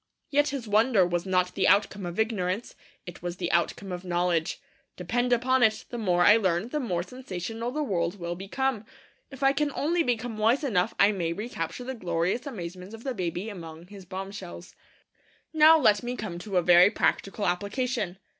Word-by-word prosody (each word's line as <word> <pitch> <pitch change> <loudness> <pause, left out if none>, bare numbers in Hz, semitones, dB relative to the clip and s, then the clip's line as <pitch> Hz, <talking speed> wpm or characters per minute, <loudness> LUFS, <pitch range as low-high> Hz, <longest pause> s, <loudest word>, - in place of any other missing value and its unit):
Yet 290 +1 +3
his 275 -5 -4
wonder 215 -1 +4
was 175 +1 -2
not 180 -1 +1
the 195 - +1
outcome 200 -2 +2
of 175 +4 -6
ignorance; 210 -1 -1 0.3
it 175 - -10
was 175 0 -5
the 175 -2 -2
outcome 170 +3 0
of 180 0 -5
knowledge. 175 -2 0 0.4
Depend 245 +8 -1
upon 255 +2 +2
it, 220 -2 +2
the 240 - -4
more 180 -5 +2
I 210 - +8
learn, 190 0 0
the 300 - -2
more 180 -10 -2
sensational 225 0 -5
the 300 +4 -2
world 175 -6 -1
will 170 0 -3
become. 215 +6 -2 0.5
If 270 0 -8
I 270 0 +5
can 290 +1 0
only 335 +4 +1
become 240 -5 -2
wise 230 +7 +3
enough 195 -10 0
I 200 +1 +6
may 170 -5 -2
recapture 185 -1 -5
the 260 +2 -4
glorious 180 +3 -2
amazements 185 -3 -7
of 225 - -13
the 265 - -2
baby 180 -1 -3
among 165 -5 -9
his 200 -2 -11
bombshells. 190 -1 -8 0.8
Now 315 +1 +7
let 215 -9 +4
me 245 +1 -4
come 190 -7 -5
to 195 0 -3
a 180 - +3
very 175 +2 +7
practical 205 -1 -1
application. 200 +1 -2
200 Hz, 185 wpm, -27 LUFS, 180-245 Hz, 0.8 s, I